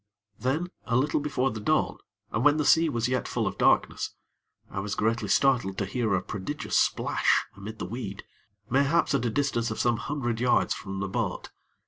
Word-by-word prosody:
Then, 155 +8 -1
a 120 - 0
little 145 +5 +2
before 135 -3 0
the 110 - -5
dawn, 105 - +1 0.3
and 110 - 0
when 150 +1 +5
the 150 - 0
sea 165 +3 +5
was 115 -4 0
yet 130 0 -1
full - - -1
of - - -3
darkness, - - +2 0.5
I - - -5
was 100 +1 -3
greatly 115 +2 0
startled 120 -8 +2
to 100 - 0
hear 110 0 0
a 90 - -1
prodigious 105 +10 -4
splash - - +2
amid 105 +3 -8
the - - -4
weed, 100 -1 -6 0.4
mayhaps 140 +6 +2
at 130 -3 +1
a - - +2
distance 120 -1 0
of - - -4
some 120 -1 +2
hundred 120 -4 -2
yards 125 0 +3
from 95 -2 -6
the 100 - -1
boat. 95 - -3
120 Hz, 190 wpm, -27 LUFS, 105-140 Hz, 0.5 s, when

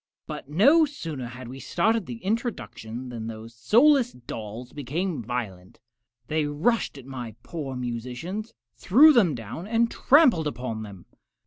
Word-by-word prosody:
But - - -7
no 275 - +5
sooner 165 - -4
had 125 +1 -9
we 130 +2 -8
started 220 +8 0
the 235 -1 -8
introduction 160 - -4
than 115 -2 -6
those 115 0 -8
soulless 245 - +4
dolls 120 0 -8
became 150 +4 -3
violent. 105 -6 -5 0.5
They 155 -1 0
rushed 155 +5 0
at 135 - -11
my 125 -5 -7
poor 145 -6 -5
musicians, 125 - -5 0.2
threw 285 - +6
them 190 - +4
down, 120 - -7
and 230 +1 +2
trampled 260 - +4
upon 125 -4 -4
them! 100 -4 -10
145 Hz, 140 wpm, -26 LUFS, -, 0.5 s, threw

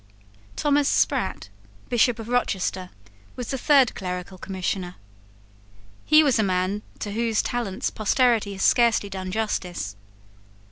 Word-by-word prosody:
Thomas 290 -1 +2
Sprat, 250 - 0 0.4
Bishop 240 0 +2
of 225 -1 -8
Rochester, 190 -6 -1 0.5
was 250 -2 -5
the 270 - -1
third 275 -3 +4
clerical 180 0 -6
Commissioner. 185 -1 -4 1.1
He 310 +1 +6
was 265 -6 +2
a - - +3
man 185 +1 0 0.2
to 205 - -5
whose 225 0 0
talents 235 -6 -2
posterity 220 -1 +2
has 195 - -4
scarcely 230 -4 +3
done 190 -1 -5
justice. 180 - -3
215 Hz, 125 wpm, -24 LUFS, 185-245 Hz, 1.1 s, He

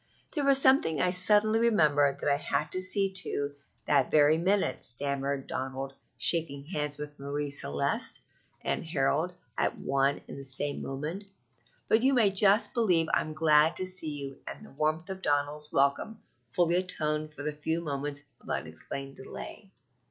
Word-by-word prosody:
"There 295 - -1
was 275 -1 +5
something 260 - +3
I 180 - +2
suddenly 210 +4 +4
remembered 150 -11 +2
that 145 - +1
I - - +1
had 145 +1 -2
to 185 - -1
see 195 +1 +1
to 145 -6 0 0.3
that 140 -3 +2
very 150 0 +5
minute," 185 -6 0
stammered 140 +2 -3
Donald, 135 +1 -5 0.2
shaking 150 -4 +2
bands 150 -1 -1
with 150 0 -8
Marie 140 +1 -4
Celeste 70 - -1 0.4
and - - -2
Harold 160 +2 0 0.3
at - - 0
one 140 +1 0
and - - -8
the - - -8
same 140 +2 -1
moment; 150 +9 -5 0.6
"but 220 - +3
you 265 +2 +3
may 220 -5 +4
just 200 +2 +5
believe 180 -9 +2
I'm 155 - 0
glad 155 0 +4
to 185 - -1
see 160 -6 -1
you 135 0 -8
and - - -8
the - - -15
warmth 155 +5 -2
of 190 0 -7
Donald's 145 -1 -1
welcome 140 +11 0 0.3
fully 175 +5 +2
atoned 155 -4 -1
for 145 - -7
the 150 0 -2
few 160 +2 -2
moments 145 -2 -4 0.2
of - - -15
unexplained 135 0 -6
delay. 195 +8 -10
150 Hz, 165 wpm, -29 LUFS, 140-185 Hz, 0.6 s, was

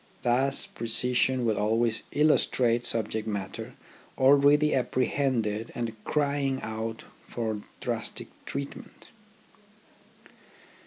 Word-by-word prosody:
Thus 130 +3 +1
precision 125 +2 +2
will 110 -3 +1
always 115 +2 +1
illustrate 125 -5 +2
subject 110 -1 -1
matter 100 -3 -4 0.4
already 145 +3 +5
apprehended 125 -4 0
and 115 -2 -3
crying 140 -2 0
out 110 +1 -4 0.2
for 110 -3 -3 0.2
drastic - - -3 0.2
treatment. 140 0 -7
120 Hz, 85 wpm, -28 LUFS, 110-135 Hz, 0.4 s, already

